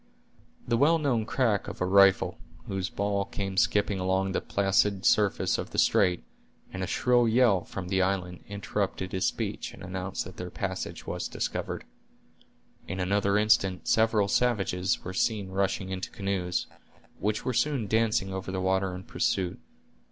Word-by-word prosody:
The 115 - +2
well 155 +6 +4
known 125 -8 0
crack 115 -7 +1
of - - -7
a 90 - +1
rifle, 100 0 +4 0.3
whose 95 -1 -3
ball 100 0 -1
came 100 -1 -4
skipping 100 0 +2
along 95 +1 0
the - - -1
placid 100 0 +1
surface 105 -2 +3
of - - -5
the - - -7
strait, 90 -3 +3 0.5
and 95 - -4
a 95 - -2
shrill 120 -1 +3
yell 110 -6 +4
from 95 -2 -6
the 95 0 +1
island, 90 -2 -1
interrupted 100 -2 -3
his 95 -2 0
speech, - - -3
and - - -12
announced 95 +1 -4
that 90 0 -11
their 90 - -5
passage - - -4
was - - -3
discovered. - - -3 1.0
In 95 +2 -4
another 100 +2 +2
instant 100 -3 +2
several 110 -2 +3
savages 100 -5 +1
were 95 - -5
seen 100 0 0
rushing 95 0 -1
into 95 -2 -4
canoes, 95 -3 -2 0.5
which 105 0 -1
were 130 - 0
soon 125 0 +1
dancing 110 -2 +1
over 95 0 -4
the 95 - -2
water 95 0 0
in 90 - -8
pursuit. 90 -1 -1
95 Hz, 160 wpm, -28 LUFS, 95-105 Hz, 1.0 s, well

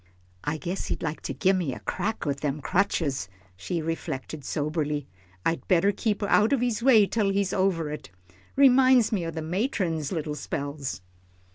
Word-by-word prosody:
"I 150 +2 -1
guess 180 +4 -4
he'd - - -3
like 160 -1 -3
to - - -4
gimme 185 -7 +1
a - - -7
crack 220 -2 -3
with 140 -2 -1
them 145 0 -2
crutches," 150 - 0 0.3
she 125 - -3
reflected, 155 -2 -4
soberly, 150 0 -2 0.4
"I'd 165 - 0
better 185 +2 +4
keep 210 0 -1
out 210 +4 +4
of 275 - +3
his 240 -3 0
way 230 -5 +6
till 205 0 0
he's 195 -1 0
over 175 -5 +1
it. 150 - -7 0.5
Reminds 260 -3 +6
me 185 -6 -1
o' - - -2
the 160 -1 -5
matron's 170 - -1
little 155 -4 -2
spells." 140 -5 -4
170 Hz, 165 wpm, -26 LUFS, 150-205 Hz, 0.5 s, way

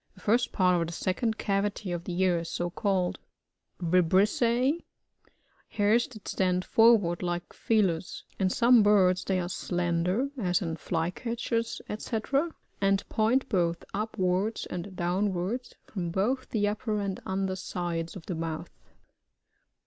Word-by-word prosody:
The - - -17
first 235 +3 +2
part 180 -2 +3
of 165 - -1
the 170 - -6
second 220 +7 -1
cavity 200 -1 -1
of 175 -1 -4
the 180 -1 -3
ear 180 -2 +3
is 165 - -6
so 175 0 -2
called. 190 -2 0 0.6
ViBRisSiB. 215 - +3 0.4
— - - -36
Hairs 215 +3 +3
that 215 -6 -12
stand 185 -1 0
forward 220 -7 +4
like 175 -1 -3
feelers; 190 -7 0 0.2
in 190 -1 +2
some 235 +3 +5
birds 190 -3 +4
they 190 -1 0
are 175 - -2
slender, 175 +7 0
as 180 -3 +1
in 165 -5 -3
Fly 165 +1 -1
catchers, 230 +1 -3
&c« 225 +1 -3 0.6
and 195 0 +2
point 235 +5 +2
both 170 -6 0
upwards 200 0 -1
and 185 +2 -5
down 185 +3 0
wards, 220 +9 -3
from 180 -5 -4
both 220 +10 -1
the 205 -2 +1
upper 210 0 -1
and 195 -2 -3
under 190 0 -1
sides 175 -2 -4
of 185 - -9
the 180 - -3
mouth. 160 -1 -4
190 Hz, 150 wpm, -28 LUFS, 175-220 Hz, 0.6 s, some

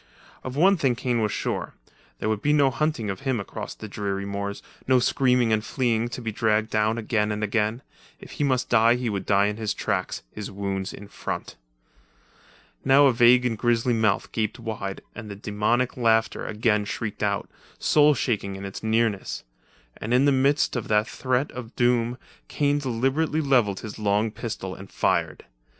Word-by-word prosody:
Of 130 0 -5
one 190 +6 +5
thing 135 -6 +1
Kane 120 -1 -1
was 105 -1 0
sure; - - -3 0.4
there - - -3
would 110 -1 0
be 150 - +2
no 140 -3 +4
hunting 125 -6 -1
of 95 - -6
him 135 -4 -1
across 100 - -6
the 110 - -8
dreary 100 -1 -3
moors, 100 0 -4 0.2
no 130 0 +5
screaming 125 -2 +2
and 110 0 +1
fleeing 120 -2 0
to 120 - -6
be 110 - -2
dragged 110 0 +1
down 110 +1 +1
again 105 -2 0
and 105 0 -3
again. 110 +3 0 0.4
If - - -12
he - - -2
must 130 -2 +1
die 115 0 +5
he 125 -2 -2
would 100 -2 -4
die 100 0 +4
in 105 +1 -1
his 110 -2 -2
tracks, 95 -2 -2
his 105 -2 -6
wounds 95 -1 -3
in 100 - -10
front. - - -5 1.3
Now 135 +2 +6
a 135 - +5
vague 120 +1 +5
and 120 -2 +1
grisly 120 +1 +1
mouth 110 -3 +1
gaped 110 -2 -2
wide 110 -5 -5
and 110 -3 -8
the 100 - -6
demoniac 105 +5 0
laughter 115 -2 +1
again 105 -1 +1
shrieked 105 +1 -4
but, 100 -1 0 0.3
soul 150 -1 +4
shaking 105 -7 -1
in 95 +1 -7
its 100 - -7
nearness. 110 -2 0 0.5
And 115 +3 -1
in 130 +3 +4
the 145 - +5
midst 135 +2 +2
of 120 - -3
feat 105 0 +3
threat 130 +3 -1
of 120 -2 -9
doom, 120 -1 +2 0.3
Kane 145 0 +1
deliberately 135 +5 0
levelled 125 -10 +2
his 110 0 -8
long 105 +1 +1
pistol 105 -5 -5
and 95 +1 -11
fired. - - 0
115 Hz, 185 wpm, -25 LUFS, 105-125 Hz, 1.3 s, Now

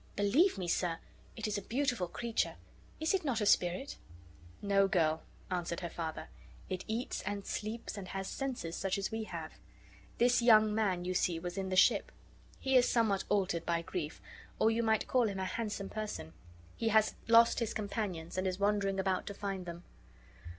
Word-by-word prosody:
Believe 250 - +3
me, 180 -2 -3
sir, 170 -1 0 0.4
it 220 -2 -3
is 210 -1 -1
a - - -9
beautiful 240 -3 0
creature. 235 +5 -1 0.4
Is 315 +3 +1
it 385 - +1
not 260 -6 0
a 210 - 0
spirit?" 180 +8 +2 0.6
"No, 195 -1 +3
girl," 160 -4 +2 0.3
answered 175 -1 -2
her 170 -2 -4
father; 160 -2 -5 0.4
"it 185 -1 -3
eats, 230 +3 -2
and 200 0 -4
sleeps, 215 0 -4
and 190 - -7
has 195 +1 -4
senses 250 -12 -3
such 195 0 -1
as 195 - -2
we 220 0 -3
have. - - -6 0.7
This 245 0 +4
young 215 -2 +6
man 190 -5 0
you 185 - -1
see 175 -2 +1
was 175 +1 -5
in 190 -1 -3
the 185 - -1
ship. 185 - +4 0.5
He 265 0 +1
is 250 -1 +6
somewhat 220 -5 +2
altered 190 -4 +1
by 170 -1 0
grief, 165 -3 -4 0.4
or 220 - +4
you 230 +1 +1
might 220 -1 +1
call 250 -3 +3
him 195 - -4
a 190 - -2
handsome 205 0 -3
person. 210 - -5 0.4
He 225 - 0
has 220 0 +4
lost 230 0 +6
his 230 -2 -1
companions, 195 -5 -3
and 185 - 0
is 185 -1 -1
wandering 200 -1 +1
about 190 -1 0
to 200 - -5
find 195 -3 -4
them." 170 +1 -7
200 Hz, 185 wpm, -33 LUFS, 180-225 Hz, 0.7 s, young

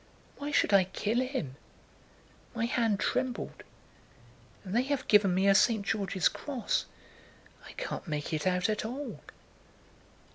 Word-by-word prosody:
Why 285 +1 -4
should 295 - +2
I 195 -2 +6
kill 215 +5 -1
him? 255 - -3 1.0
My 230 0 0
hand 230 -4 +1
trembled. 255 -2 -2 1.0
And 190 +1 -5
they 240 - +5
have 275 +1 -2
given 200 -4 +5
me 190 +2 +3
a 195 - +7
St. 210 0 +3
George's 195 -4 +1
Cross.... 260 -7 -2 0.8
I - - -11
can't - - -5
make 150 +1 -3
it 155 +2 -1
out 180 +1 +2
at 215 -1 -1
all." 260 +6 -5
215 Hz, 140 wpm, -30 LUFS, 190-250 Hz, 1.0 s, a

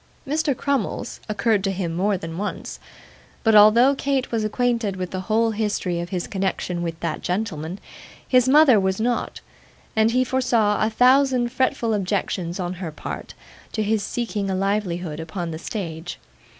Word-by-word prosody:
Mr. 295 -2 0
Crummles 275 -7 -2
occurred 215 -1 +1
to 195 - +1
him 180 -3 -2
more 195 +3 +1
than 165 0 -6
once; 210 - -5 0.6
but 225 - +4
although 215 +6 +7
Kate 275 -1 -1
was 225 -2 0
acquainted 230 -2 0
with 185 -1 -4
the 185 - -3
whole 225 +1 +3
history 205 -5 -1
of 175 0 -4
his 180 -3 -2
connection 190 -2 -2
with 165 -1 -4
that 165 -2 -2
gentleman, 180 -3 -3 0.5
his 255 0 +4
mother 280 -5 +7
was 190 0 0
not; 240 +2 -1 0.5
and 220 0 +4
he 255 +2 +2
foresaw 240 -5 +1
a 215 - +2
thousand 250 +1 +3
fretful 260 -3 0
objections, 185 -3 -2
on 180 -1 -2
her 170 -4 -4
part, 150 - -7 0.4
to 215 - 0
his 215 0 +1
seeking 210 -3 -3
a 190 - 0
livelihood 185 -5 -1
upon 165 +1 -4
the 160 - -6
stage. 175 -3 -5
210 Hz, 165 wpm, -23 LUFS, 180-240 Hz, 0.6 s, although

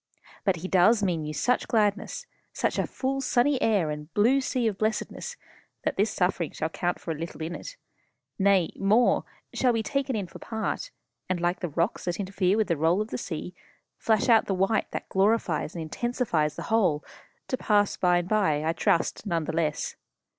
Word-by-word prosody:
But 195 -3 +2
he 175 +2 -5
does 205 +4 +4
mean 170 -5 0
you 150 - -4
such 250 +9 +1
gladness, 210 - 0 0.3
such - - 0
a - - 0
full 270 +1 -2
sunny 255 +1 +2
air 195 -9 +2
and 150 +1 -7
blue 245 +7 +4
sea 255 -2 -1
of 210 -3 -1
blessedness 220 - -2 0.5
that - - -1
this 205 +3 +2
suffering 180 -4 0
shall 160 - -2
count 175 +2 -2
for 165 - -4
little 160 +1 -6
in 165 +2 -4
it; - - -8 0.6
nay 195 -3 +3
more, 215 +5 +3 0.3
shall 255 - +3
be 225 -1 0
taken 275 +2 -1
in 205 -3 -2
for 170 - -12
part, 220 -2 -3 0.4
and, 185 -1 0
like 175 +1 0
the 175 - -3
rocks 170 +8 -1
that 175 +1 -2
interfere 195 0 +1
with 220 - +2
the 170 -3 0
roll 165 +5 +2
of 215 +1 -2
the - - -3
sea, 180 -3 -5 0.4
flash 220 +1 +1
out 225 -3 +5
the 195 - 0
white 195 +4 +1
that - - -5
glorifies 190 -5 +1
and 165 - -3
intensifies 170 - -1
the - - -5
whole 180 -10 +2 0.4
to - - 0
pass 205 -5 +2
away - - -27
by 180 -1 +4
and 175 0 -1
by, 190 -8 +2
I 165 - +1
trust, 170 +5 0
none 170 -4 0
the 160 - -3
less. 155 -2 -1
195 Hz, 195 wpm, -27 LUFS, 170-225 Hz, 0.6 s, out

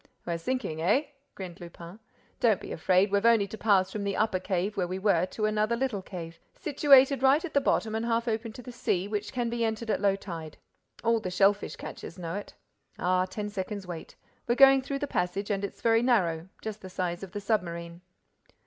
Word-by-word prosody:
"We're 170 -1 -2
sinking, 165 -6 -2
eh?" 210 - +3 0.3
grinned 185 -2 -8
Lupin. 170 +3 -10 0.4
"Don't 220 -5 +3
be - - -9
afraid—we've 195 +4 +2
only 230 -3 +5
to 200 - -8
pass 195 -3 +2
from 210 0 -4
the 200 -1 -1
upper 215 -3 +1
cave 190 +2 -1
where 185 -3 0
we 185 +1 -3
were 190 -3 +2
to 215 +3 -2
another 215 +2 +1
little 235 -5 -1
cave, 165 -3 -8 0.2
situated 275 -2 +5
right 275 +6 +4
at 340 - -8
the 280 - +3
bottom 220 -5 +1
and 225 +1 -1
half 230 +1 0
open 225 0 -2
to 250 - -10
the 250 - -8
sea, 195 -6 -1
which 210 0 -3
can 245 -1 -1
be 235 0 -1
entered 220 0 -1
at - - 0
low 200 -1 +3
tide. 165 -6 -8 0.5
All 230 0 +3
the 185 - -4
shellfish 200 +2 +2
catchers - - -8
know 165 -2 -5
it. 205 +1 -6 0.4
Ah, 185 +1 +2
ten 205 +3 -4
seconds' 200 0 -5
wait! 175 -3 -8 0.3
We're 240 - +2
going 270 0 +7
through 275 +1 -3
the 290 - -2
passage 195 -3 -2
and 200 0 -1
it's 200 - -6
very 225 0 +4
narrow, 185 -9 +1
just 215 -1 -5
the 185 - -8
size 180 -1 -3
of 195 -2 -9
the 205 - -3
submarine." 170 -5 -2
205 Hz, 210 wpm, -28 LUFS, 185-230 Hz, 0.5 s, going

